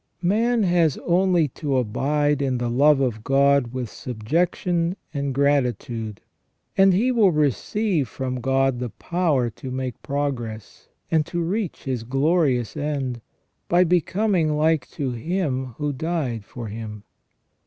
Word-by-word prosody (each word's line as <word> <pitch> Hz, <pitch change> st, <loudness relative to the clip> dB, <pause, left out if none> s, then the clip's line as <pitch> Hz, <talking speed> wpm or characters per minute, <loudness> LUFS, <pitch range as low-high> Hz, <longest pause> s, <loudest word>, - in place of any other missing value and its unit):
Man 225 Hz, +5 st, +2 dB
has 175 Hz, -5 st, +2 dB
only 175 Hz, -2 st, +3 dB
to 140 Hz, +1 st, -2 dB
abide 145 Hz, +5 st, +1 dB
in 130 Hz, -2 st, 0 dB
the 120 Hz, -1 st, -2 dB
love 145 Hz, +3 st, +5 dB
of 120 Hz, -5 st, -1 dB
God 140 Hz, -2 st, +3 dB
with 130 Hz, -1 st, -3 dB
subjection 165 Hz, -, -1 dB, 0.2 s
and 140 Hz, -1 st, -2 dB
gratitude, 125 Hz, -6 st, 0 dB, 0.5 s
and 195 Hz, 0 st, +6 dB
He 225 Hz, +8 st, +2 dB
will 220 Hz, -6 st, +4 dB
receive 155 Hz, -, 0 dB
from 130 Hz, +1 st, -4 dB
God 135 Hz, 0 st, +1 dB
the 125 Hz, -1 st, -3 dB
power 155 Hz, -6 st, 0 dB
to 130 Hz, +4 st, -8 dB
make 130 Hz, -2 st, -4 dB
progress, 125 Hz, -7 st, -4 dB, 0.2 s
and 160 Hz, -2 st, +3 dB
to 175 Hz, -, -3 dB
reach 190 Hz, +1 st, -3 dB
His 130 Hz, -4 st, -2 dB
glorious 135 Hz, -, +1 dB
end, 140 Hz, -5 st, -2 dB, 0.5 s
by 175 Hz, +1 st, +5 dB
becoming 180 Hz, -2 st, +1 dB
like 160 Hz, 0 st, +2 dB
to 140 Hz, -5 st, -3 dB
Him 130 Hz, -, -2 dB
who 150 Hz, -1 st, -1 dB
died 135 Hz, -7 st, -2 dB
for 120 Hz, +1 st, -8 dB
him. 105 Hz, -1 st, -7 dB
140 Hz, 135 wpm, -23 LUFS, 125-170 Hz, 0.5 s, and